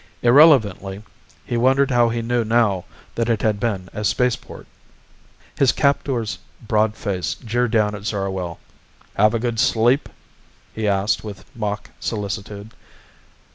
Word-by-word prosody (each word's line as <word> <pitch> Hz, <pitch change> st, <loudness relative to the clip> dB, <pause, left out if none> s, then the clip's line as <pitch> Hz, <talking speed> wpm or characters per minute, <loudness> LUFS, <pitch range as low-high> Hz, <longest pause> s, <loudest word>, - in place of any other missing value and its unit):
Irrelevantly 115 Hz, -, +4 dB, 0.4 s
he 120 Hz, -, -2 dB
wondered 135 Hz, +3 st, +3 dB
how 120 Hz, -1 st, +4 dB
he 115 Hz, 0 st, -2 dB
knew 120 Hz, 0 st, 0 dB
now 110 Hz, -5 st, +1 dB, 0.3 s
that 115 Hz, 0 st, -1 dB
it 115 Hz, -3 st, 0 dB
had 105 Hz, -2 st, +1 dB
been 100 Hz, -5 st, -2 dB
a 105 Hz, -, -4 dB
spaceport. 120 Hz, +4 st, -1 dB, 0.9 s
His 135 Hz, -3 st, +5 dB
captor's 135 Hz, -5 st, 0 dB, 0.2 s
broad 110 Hz, -1 st, 0 dB
face 100 Hz, -5 st, -3 dB
jeered 120 Hz, 0 st, -1 dB
down 105 Hz, -2 st, +1 dB
at 105 Hz, 0 st, -8 dB
Zarwell. 95 Hz, -5 st, -3 dB, 0.6 s
"Have 105 Hz, +3 st, +3 dB
a -, -, 0 dB
good 115 Hz, -1 st, -2 dB
sleep?" 120 Hz, +2 st, +2 dB, 0.6 s
he 110 Hz, -1 st, -2 dB
asked 100 Hz, +2 st, +1 dB
with 105 Hz, -2 st, -9 dB
mock 105 Hz, -2 st, -4 dB
solicitude. 105 Hz, 0 st, -5 dB
110 Hz, 135 wpm, -21 LUFS, 100-120 Hz, 0.9 s, His